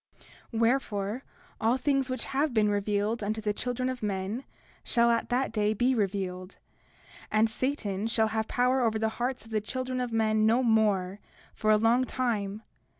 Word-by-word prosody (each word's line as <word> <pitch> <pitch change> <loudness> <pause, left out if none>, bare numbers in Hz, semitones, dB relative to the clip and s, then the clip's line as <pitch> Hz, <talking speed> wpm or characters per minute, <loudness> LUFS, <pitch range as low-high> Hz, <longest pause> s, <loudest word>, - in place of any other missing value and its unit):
30:18 225 - -3
Wherefore, 230 -2 0 0.4
all 230 +3 +3
things 275 0 +1
which 255 -2 -1
have 275 -1 -1
been 210 -1 +3
revealed 205 +2 0
unto 215 +2 -2
the 210 -1 -1
children 250 +3 -2
of 255 -1 -3
men 205 +4 -3 0.4
shall 235 -1 +3
at 230 - 0
that 255 +1 0
day 215 -1 +1
be 245 +4 +2
revealed; 190 -4 -2 0.8
and 215 +1 +4
Satan 220 -4 -2
shall 220 -1 +2
have 220 0 -1
power 255 +1 +2
over 225 -2 +1
the 220 0 0
hearts 250 0 -2
of 225 - -15
the 215 -1 0
children 255 +3 -3
of 245 -1 -3
men 220 -1 +2
no 235 +4 +3
more, 205 -4 +2 0.3
for 215 - -1
a 215 - +6
long 230 +4 +3
time. 220 -5 -2
225 Hz, 175 wpm, -28 LUFS, 210-250 Hz, 0.8 s, a